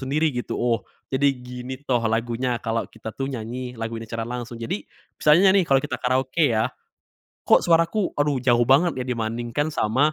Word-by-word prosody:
sendiri 150 +4 +1
gitu. 120 - -3
Oh, 120 -1 +1 0.3
jadi 140 +2 +3
gini 125 +1 -8
toh 125 -2 +3
lagunya 120 +2 -1
kalau 115 0 -1
kita 110 - -8
tuh 135 - -2
nyanyi 125 +1 -5
lagu 115 0 -4
ini 115 - -8
secara 115 0 -3
langsung. 120 -1 -5
Jadi 115 -3 -3 0.4
misalnya 170 +6 +6
nih, 195 -2 +4
kalau 135 -1 +5
kita - - -3
karaoke 130 +3 +1
ya, 110 +3 +1 0.8
kok - - +6
suaraku, 170 +4 +2
aduh 145 -1 +2
jauh 120 -2 +4
banget 140 +1 +4
ya - - -10
dibandingkan 120 +5 -2
sama 130 +5 +2
125 Hz, 180 wpm, -24 LUFS, 115-140 Hz, 0.8 s, misalnya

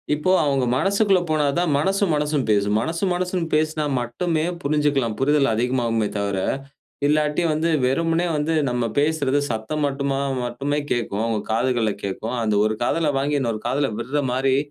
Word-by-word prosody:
இப்போ 150 +5 0
அவங்க 135 -3 +1
மனசுக்குள்ள 200 +2 +3
போனாதான் 155 +3 +1
மனசும் 195 +2 +1
மனசும் 150 -2 0
பேசும், 105 0 +2
மனசும் 170 +6 -1
மனசும் 180 -1 -1
பேசினா 155 0 +1
மட்டுமே 155 +7 -1 0.2
புரிஞ்சிக்கலாம், 140 -6 +1
புரிதல் 140 -2 +3
அதிகமாகுமே 115 -2 0
தவிர, 100 -1 -1 0.7
இல்லாட்டி 150 +2 +1
வந்து 160 +2 0 0.2
வெறுமனே 165 +5 +1
வந்து 150 +2 0 0.2
நம்ம 125 -1 -1 0.2
பேசுறது 145 -2 +1
சத்தம் 115 +7 -3
மட்டுமா 140 0 -1 0.3
மட்டுமே 140 +5 -2
கேட்கும், 110 -3 -1
அவங்க 115 -2 0
காதுகள்ல 120 -2 +1
கேட்கும், 105 +5 -3
அந்த 105 -1 +1
ஒரு 110 - +1
காதில 155 +3 +1
வாங்கி 145 +1 0
இன்னொரு 115 -5 -2
காதில 135 +2 +1
விடுற 135 +5 -1
மாரி 130 0 +2
140 Hz, 145 wpm, -22 LUFS, 120-155 Hz, 0.7 s, மனசுக்குள்ள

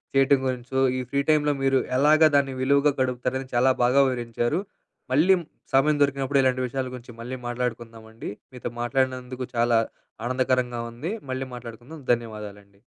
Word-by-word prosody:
చేయటం 135 0 +5
గురించో, 130 +1 -2 0.2
ఈ - - -1
ఫ్రీ 140 - +2
టైమ్‌లో 150 -1 +3
మీరు, 135 -1 +3 0.2
ఎలాగా 155 +3 +6
దాన్ని 135 -2 +2
విలువగా 140 +2 +3
గడుపుతారని, 130 +1 -1
చాలా 130 +2 +5
బాగా 130 +3 +5
వివరించారు. 120 +5 -1 0.5
మళ్ళీ 180 +7 +5 0.3
సమయం 140 +3 +4
దొరికినప్పుడు, 140 0 +1
ఇలాంటి 130 0 +2
విషయాల 130 +1 -3
గురించి 120 -1 -11
మళ్ళీ 130 +2 -5
మాట్లాడుకుందామండి. 115 -2 -5 0.2
మీతో 125 -1 -5
మాట్లాడినందుకు 130 0 -1
చాలా 115 0 +3 0.5
ఆనందకరంగా 125 -1 0
ఉంది, 135 - -5 0.2
మళ్ళీ 130 0 -3
మాట్లాడుకుందాం, 120 +6 -10
ధన్యవాదాలండి. 105 -3 -7
130 Hz, 135 wpm, -25 LUFS, 120-135 Hz, 0.5 s, ఎలాగా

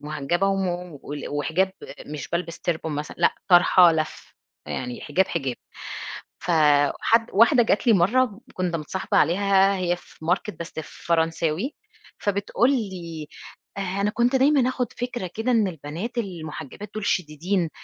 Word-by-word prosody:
محجبة 155 +5 -1
ومُ 180 -5 -2
وال 145 0 -6
وحجاب 160 +6 0 0.3
مش 150 -1 -6
بالبس 170 -1 -3
تربون 160 -2 -2
مثلًا، 150 +1 -5
لأ - - +3
طرحة 175 -1 +7
لفّ، 155 -1 -4 0.3
يعني 125 -1 -4
حجاب، 185 +6 +1
حجاب، 135 -7 -2 0.8
فحد 155 +7 +3
واحدة 235 +5 +6
جت 215 0 +1
لي 230 - +7
مرّه 215 +4 +2
كنت 180 -2 -1
متصاحبة 165 +4 -3
عليها 195 +4 +4
هي 175 -1 0
في 160 - -16
ماركت 185 +6 -1
بس 170 - -6 0.3
فرنساوي 165 - 0 0.4
فبتقول 205 +5 +1
لي: 180 - -3 0.5
"أنا 200 +1 -1
كنت 240 +4 +2
دايمًا 270 -1 +4
آخد 255 -1 -2
فكرة 240 -7 -4
كده 225 +3 -1
إن 220 -5 +3
البنات 170 - -6
المحجبات 175 - -6
دول، 215 -1 -4
شديدين 170 +1 0
180 Hz, 135 wpm, -24 LUFS, 160-210 Hz, 0.8 s, طرحة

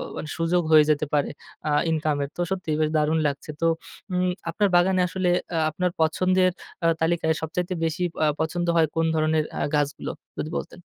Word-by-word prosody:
মানে 155 - -5
সুযোগ 170 +2 +2
হয়ে 155 -1 +8
যেতে 150 0 +2
পারে 145 -1 +2 0.4
আ - - +1 0.2
ইনকাম 155 -1 +1
এর। 140 - -4
তো 175 - -1
সত্যিই 175 -5 -1 0.2
দারুণ 155 +1 +2
লাগছে। 140 +2 -5
তো - - +2 0.5
উম 180 0 +1 0.2
আপনার 205 +4 +2
বাগানে 185 +1 +4
আসলে 185 +1 -2 0.3
আ - - +1
আপনার 180 +3 -1
পছন্দের 185 +3 +3 0.3
আ - - +6
তালিকায় 165 0 +1
সবচাইতে 175 +3 -2
বেশি 165 +3 -1 0.2
আ - - +4
পছন্দ 175 +2 -1
হয় 160 - +5
কোন 165 0 +2
ধরণের 155 0 +2
আ - - -1
গাছগুলো? 145 -1 -1 0.3
যদি 155 - -3
বলতেন? 175 - -7
165 Hz, 180 wpm, -25 LUFS, 155-180 Hz, 0.5 s, হয়ে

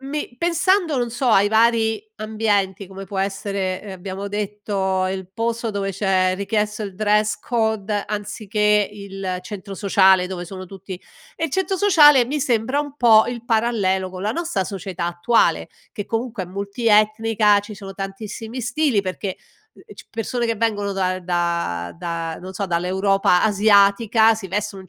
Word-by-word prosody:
Ehm, 270 - -9
mi 290 -4 -4
pensando, 340 -2 +1
non 240 -1 -1
so, 245 +2 -1
ai 205 -2 +5
vari 220 -1 +2
ambienti 210 -3 -1
come 195 +1 -9
può 195 +1 -6
essere, 195 -1 -2
ehm, 200 -2 -8
abbiamo 190 +2 -6
detto 200 -2 -2
il 190 -1 -4
posto 230 0 -2
dove 200 -1 -2
c'è 185 -1 +1
richiesto 210 +1 -1
il 195 -2 -6
dress 210 +1 +1
code, 220 -3 -1
anziché 210 0 0
il 195 -2 -5
centro 200 0 -8
sociale, 190 -2 +4
dove 180 -1 -5
sono 185 +1 -8
tutti 190 -1 -9 0.3
e 325 - -3
il 325 - -2
centro 380 +4 0
sociale 300 -10 +6
mi 290 +3 -2
sembra 255 +1 +1
un 290 -1 -7
po' 225 -4 +6
il 235 -1 -5
parallelo 215 -5 +1
con 185 0 -7
la 215 +2 0
nostra 335 - -2
società 185 -3 -5
attuale, 175 +7 +1 0.2
che 205 -4 -5
comunque 230 -3 -3
è - - -13
multietnica, 210 +1 +2
ci 205 +1 -10
sono 195 -1 -9
tantissimi 215 +5 -6
stili 240 -1 +1
perché, 190 0 -4 0.4
ehm, - - -18
c - - -13
persone 235 +2 -2
che 230 -1 -1
vengono 205 -3 -1
da 185 -1 -1
da 170 - -2
da 170 -2 -4
non 185 +1 -8
so, 200 +1 -2
dall'Europa 185 +2 +2
asiatica 215 +2 +4
si 200 -4 -7
vestono 205 0 -3
in 185 - -18
205 Hz, 165 wpm, -21 LUFS, 190-225 Hz, 0.4 s, sociale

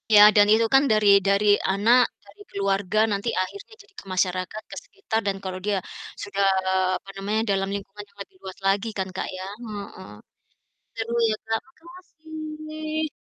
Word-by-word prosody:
Ya 205 - +10
dan 205 0 +6
itu 225 +1 +4
kan 270 +1 +7
dari 215 -1 +3 0.2
dari 200 +1 +3 0.3
anak, 230 +6 +5 0.2
dari 410 - -18
keluarga 195 +1 0
nanti 200 +3 -2
akhirnya 400 - -7
jadi 410 - -26
ke - - -14
masyarakat, 185 +3 -1
ke - - -7
sekitar 395 - -3
dan 195 -1 0
kalau 185 -1 -4
dia 205 -1 +1 0.5
sudah, 200 0 -1 0.5
apa 195 - -17
namanya, 210 +3 0
dalam 195 0 0
lingkungan 200 +1 -8
yang 200 0 -27
lebih 190 - -28
luas 190 -1 -8
lagi 195 +3 +1
kan, 190 -1 -1
Kak, - - -3
ya, 185 - -6 0.2
heeh. 205 -4 -8 0.9
Seru 225 +1 -3 0.2
ya, 215 - +1
Kak, 225 0 0 0.2
makasih. 310 -2 -6
210 Hz, 165 wpm, -24 LUFS, 195-305 Hz, 0.9 s, Ya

